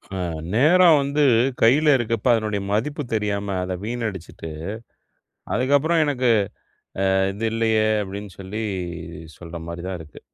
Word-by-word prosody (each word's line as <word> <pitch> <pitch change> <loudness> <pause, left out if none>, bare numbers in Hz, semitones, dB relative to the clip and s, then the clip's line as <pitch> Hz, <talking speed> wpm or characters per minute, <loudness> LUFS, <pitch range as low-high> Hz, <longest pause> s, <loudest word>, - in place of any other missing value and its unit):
ஆ, - - -3 0.4
நேரம் 160 +6 +6
வந்து 140 +2 +1 0.4
கையில 145 +6 +5
இருக்கப்ப, 115 -1 -2
அதனுடைய 105 -3 -1
மதிப்பு 145 +8 -1
தெரியாம 100 -2 -1
அத 90 0 -3
வீணடிச்சுட்டு, 105 -9 -5 1.0
அதுக்கப்புறம் 145 +6 +2
எனக்கு 130 -4 0 0.9
அ - - +3 0.2
இது 115 +3 -2
இல்லயே! 110 -1 +2 0.2
அப்பிடின்னு 100 -1 -7
சொல்லி 100 +4 -5 0.8
சொல்றமாரி 85 0 -7
தான் 95 -1 -3
இருக்கு. 75 -1 -13
110 Hz, 115 wpm, -23 LUFS, 100-140 Hz, 1.0 s, நேரம்